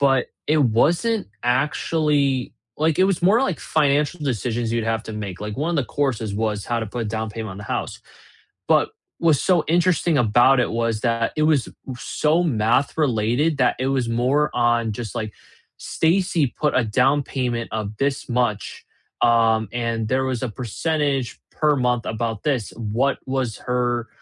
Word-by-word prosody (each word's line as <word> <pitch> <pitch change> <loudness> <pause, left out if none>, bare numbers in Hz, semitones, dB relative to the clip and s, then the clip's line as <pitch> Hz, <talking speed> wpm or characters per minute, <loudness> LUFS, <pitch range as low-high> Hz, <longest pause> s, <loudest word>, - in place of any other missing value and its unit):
But 135 -2 +3 0.2
it 155 +1 +3
wasn't 165 - +2
actually 140 +1 +1 0.3
like, 155 -1 +2
it 190 - +6
was 190 -3 +1
more, 210 +8 +4
like, 190 -11 -1
financial 150 +2 +1
decisions 120 -3 -1
you'd 115 -1 0
have 115 0 -1
to 110 - -8
make, 100 -3 -6
like 105 0 -5
1, 165 +4 -1
the 145 - +2
courses 120 -5 -2
was 105 -1 -2
how 120 -1 -1
to 110 - -3
put 115 +1 -4
down 110 0 -3
payment 110 0 -6
on 95 - -8
the 105 - -8
house, - - -4 0.7
but - - +3 0.3
what's 160 -4 +3
so 175 -4 +3
interesting 175 -1 +2
about 120 +3 +4
it - - 0
was 115 -1 -1
that, 115 -1 0
it 155 - +1
was 155 -4 +2 0.3
so 155 +6 +1
math 120 0 +1
related 140 +2 +1
that 125 - +3
it 130 - 0
was 130 -3 0
more 130 +6 +1
on 120 -2 +2
just, 110 0 -6
like, 110 -1 -3 0.5
"Stacy 165 -2 +1
put 150 +4 -1
a 130 - +3
down 130 +6 +2
payment 120 -4 -2
of 105 -1 -4
this 135 +1 -1
much, 120 -5 -1 0.4
um, 115 -2 +3
and 115 -2 -2
there 130 +2 +1
was 130 -3 -2
a 130 - -1
percentage 135 +2 -2
per 150 -1 +2
month 125 -2 0
about 110 -1 -3
this, 130 -8 0
what 115 +5 0
was 130 -4 -2
her 120 -1 0
125 Hz, 170 wpm, -22 LUFS, 115-150 Hz, 0.7 s, it